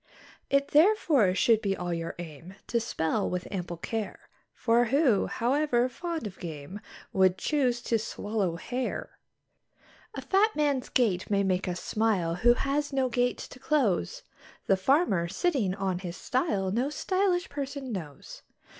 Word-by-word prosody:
It 275 0 +2
therefore 300 - +4
should 220 +2 +4
be 195 -3 -1
all 175 -1 -3
your 165 0 -4
aim 170 +2 -9
to 235 - 0
spell 205 -2 -1
with 180 0 -3
ample 175 -3 -4
care; 220 +5 -5 0.3
For 235 0 +3
who, 255 -4 +3
however 250 0 +1
fond 330 +2 -4
of 195 -3 -7
game, 160 +2 -7 0.3
would 190 -1 +4
choose 250 -4 0
to 230 - +1
swallow 205 -4 -2
hair? 245 +8 -4 1.0
A - - -4
fat 420 +3 +2
man's 285 -4 0
gait 205 -8 +1
may 200 -1 +2
make 185 0 0
us 180 -1 -3
smile, 210 -7 +1
who 240 +5 +5
has 290 +3 -1
no 265 -2 +1
gate 245 +1 +1
to 255 - -10
close; 235 - 0 0.4
The 195 - +4
farmer, 195 - +2
sitting 215 - 0
on 190 -2 -2
his 180 -2 -6
stile 205 - -1
no 240 +6 +1
_sty_lish 370 +4 0
person 280 -2 -5
knows. 160 -9 -7
225 Hz, 150 wpm, -28 LUFS, 185-275 Hz, 1.0 s, who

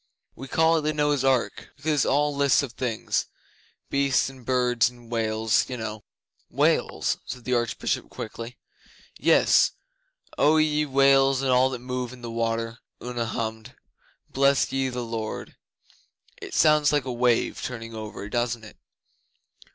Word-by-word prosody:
We 135 - -9
call 160 +3 +3
it - - -4
the 155 0 -1
Noah's 145 -2 +1
Ark, 135 -2 0
because 155 +2 -2
it's 145 - +2
all 145 +1 +2
lists 140 0 +3
of 135 - -5
things 120 -4 -2 0.6
beasts 140 -2 +2
and 130 -2 -14
birds 125 -1 +2
and 120 -1 -17
whales, 110 -1 +1
you 125 - -4
know.' 110 -2 -6 0.5
'Whales?' - - +1
said 125 -1 -7
the 125 - -2
Archbishop 120 -1 -1
quickly. 115 +3 -8 0.6
'Yes - - +4 0.7
"O 155 +2 +5
ye 150 -1 +2
whales, 135 0 +4
and 130 - +1
all 125 +1 +4
that 130 - -4
move 125 -1 -4
in 125 -1 -13
the 115 - -5
waters,"' 115 0 -2 0.2
Una 120 -2 -4
hummed 110 +1 -5 0.5
'"Bless 140 0 +2
ye 135 -1 0
the 125 -1 -4
Lord." 115 -1 -5 0.9
It - - -7
sounds 150 -2 +4
like 145 -2 +1
a 130 - -3
wave 120 -1 +1
turning 115 -2 -6
over, 110 -2 -7
doesn't 120 +1 -2
it? 110 - -13
125 Hz, 150 wpm, -25 LUFS, 115-140 Hz, 0.9 s, O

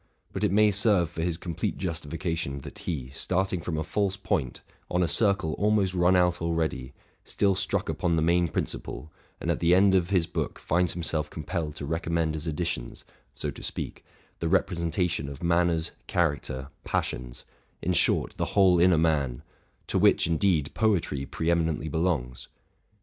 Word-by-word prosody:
But - - -3
it, 105 - +2
may 105 +1 +5
serve 100 -5 +3
for 80 - -4
his 85 -1 -1
complete 85 -2 -3
justification 80 -4 -3
that - - -9
he, 65 -7 -4
starting 95 +3 -1
from 80 -1 -3
a 80 - -1
false 100 +4 -1
point, 85 - -2 0.3
on 90 0 +1
a - - +2
circle 100 -6 +1
aioe 105 -3 +2
run 90 0 +4
out 90 -1 +2
already, 80 -6 -2 0.3
still 100 -1 +1
struck 95 0 0
upon 85 +2 0
the 80 - +1
main 85 +1 +3
principle, 75 -1 -4 0.3
and - - -1
at - - -1
the 85 +1 +4
end 95 +1 +5
of 90 -2 +2
his 90 -4 +3
book 85 - -3
finds 85 +1 +1
himself 80 -3 -2
compelled 75 -1 -4
to 75 - -6
recommend 80 0 -1
as 80 +2 -4
additions, 80 -5 -3 0.3
so - - -3
to - - -11
speak, - - -5 0.4
the 85 - -1
representation 85 -4 0
of 70 +3 -9
manners, 85 -1 +2 0.2
character, 70 -5 -1
passions, 60 0 -3 0.2
— - - -40
in - - +1
short, - - +2
the - - 0
whole 95 -3 +6
inner 90 -1 +5
man; 75 -6 +1 0.4
to - - 0
which, - - +4
indeed, 80 -2 +1
poetry 85 -10 0
pre 80 +1 -1
eminently 80 -2 0
belongs. 75 -6 -1
85 Hz, 170 wpm, -27 LUFS, 80-90 Hz, 0.4 s, whole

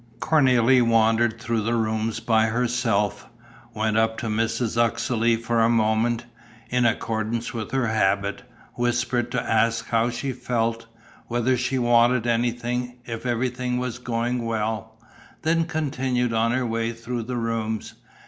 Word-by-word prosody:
Cornélie 130 -5 +4
wandered 115 0 +3
through 115 -1 -1
the 115 +3 0
rooms 110 0 -1
by 110 -1 +2
herself, 115 -3 0 0.4
went 110 -1 -1
up 110 0 +2
to - - -5
Mrs. 115 +1 -1
Uxeley 115 0 +2
for 115 0 0
a 115 - +4
moment, 115 +1 +1 0.5
in 125 0 +2
accordance 115 +1 -2
with 110 -3 -4
her 135 -2 0
habit, 100 -2 0 0.3
whispered 120 0 0
to 125 -1 -1
ask 115 +1 +1
how 115 +1 +2
she 125 +3 -3
felt, 115 -2 -2 0.4
whether 120 +2 +1
she 125 +2 -1
wanted 120 0 +3
anything, 120 +1 -1
if 115 +1 -5
everything 125 +1 -1
was 125 -1 -3
going 120 0 -2
well, 110 -1 -3 0.4
then 165 +1 +2
continued 135 -7 -1
on 115 +1 +2
her 130 +1 0
way 115 0 -1
through 115 +1 -4
the 125 +2 -4
rooms. 115 -2 -2
115 Hz, 140 wpm, -24 LUFS, 115-125 Hz, 0.5 s, Cornélie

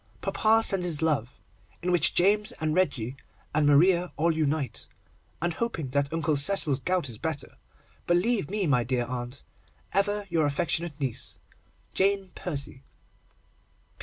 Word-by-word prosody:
Papa 225 +1 +2
sends 195 -3 +2
his 165 -3 0
love, 135 -6 -1 0.4
in 180 - 0
which 175 -4 +2
James, 210 +4 +3
and 155 -1 -2
Reggie, 135 -8 0 0.4
and 150 0 +2
Maria 175 +5 +4
all 165 +2 +2
unite, 155 -3 -1 0.6
and, 175 0 0
hoping 165 - -3
that 140 +1 0
Uncle 165 -1 0
Cecil's 145 -2 +4
gout 180 +1 0
is 115 -3 -7
better, 160 -3 -4 0.5
believe 180 +1 +2
me, 205 -1 -1 0.2
dear 120 0 -1
aunt, 125 +2 -6 0.5
ever 205 +1 +1
your 160 -3 +2
affectionate 155 +1 -2
niece, 130 -2 -3 0.6
JANE 195 -1 +1
PERCY. 140 -6 -4
160 Hz, 135 wpm, -27 LUFS, 140-185 Hz, 0.6 s, Maria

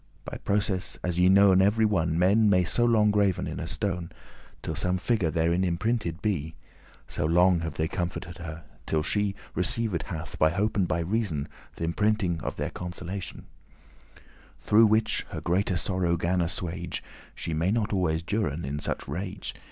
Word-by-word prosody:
By - - -6
process, 100 -2 0
as 90 -1 -1
ye 90 +1 +5
knowen 95 -1 +6
every 105 +3 +3
one, 85 -6 +1
Men 100 +5 +4
may 90 -2 +4
so 120 +7 +2
longe 110 -3 +4
graven 100 -3 +2
in - - -5
a - - -4
stone, 90 -4 -2 0.5
Till - - -3
some 90 +1 +1
figure 95 -3 +1
therein 85 +3 +1
imprinted 90 -1 -1
be: 80 -7 -1 0.5
So - - -2
long 90 +3 +4
have 80 -2 -4
they 80 - 0
comforted 90 0 -4
her, 85 -1 -7 0.2
till 75 -1 +1
she 100 +3 0 0.2
Received 110 -1 +1
hath, 80 -4 -6
by 80 - +5
hope 100 +6 -1
and 95 -3 +2
by 85 - 0
reason, 90 -5 -1 0.3
Th' - - -12
imprinting 90 +1 +1
of - - -4
their - - -3
consolation, 90 +2 -6 1.2
Through 110 +2 +5
which 110 +1 +2
her - - -5
greate 90 +1 0
sorrow 85 +1 0
gan 90 +2 +1
assuage; 85 0 -3 0.3
She 85 - -4
may 80 +4 +1
not 110 0 0
always 85 -4 0
duren 90 -6 -1
in 70 +2 -3
such - - -4
rage. 95 +1 -5
90 Hz, 170 wpm, -27 LUFS, 85-105 Hz, 1.2 s, knowen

